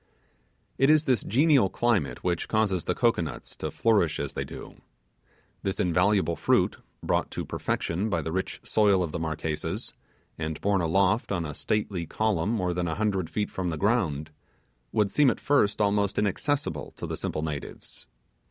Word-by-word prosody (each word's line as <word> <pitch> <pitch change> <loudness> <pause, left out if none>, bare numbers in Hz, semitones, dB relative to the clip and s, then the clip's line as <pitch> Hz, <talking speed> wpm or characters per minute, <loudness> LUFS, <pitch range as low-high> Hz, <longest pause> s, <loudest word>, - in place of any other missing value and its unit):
It 135 +2 +5
is 155 0 +6
this 130 -7 +1
genial 135 -3 +4
climate 110 -12 0
which 90 -2 -1
causes 105 -5 +1
the - - 0
cocoanuts 115 -10 -1
to - - -3
flourish 100 -8 +2
as 70 - -3
they - - -2
do. - - -10 0.8
This 95 0 -2
invaluable 90 0 +2
fruit, - - +2 0.3
brought - - 0
to - - -4
perfection 95 +7 -2
by 85 -5 0
the 80 - -3
rich 95 +2 -3
soil 100 -4 +3
of 85 - -4
the 85 - -3
Marquesas, 80 -1 -3 0.5
and 80 -1 -3
home 100 -1 +2
aloft 95 +7 +2
on 85 -4 -1
a 75 - -5
stately 95 -1 -2
column 105 -3 0
more 90 -6 0
than 90 0 -1
a 80 - -2
hundred 100 -5 0
feet 105 -1 -2
from 90 -2 -2
the 80 - -3
ground, 80 -8 0 0.6
would 105 -3 +1
seem 145 -3 +5
at - - -1
first 110 -9 +2
almost 100 -1 +1
inaccessible 100 - -1
to - - -5
the - - -3
simple 75 - -3
natives. 75 -3 -6
95 Hz, 170 wpm, -27 LUFS, 80-110 Hz, 0.8 s, is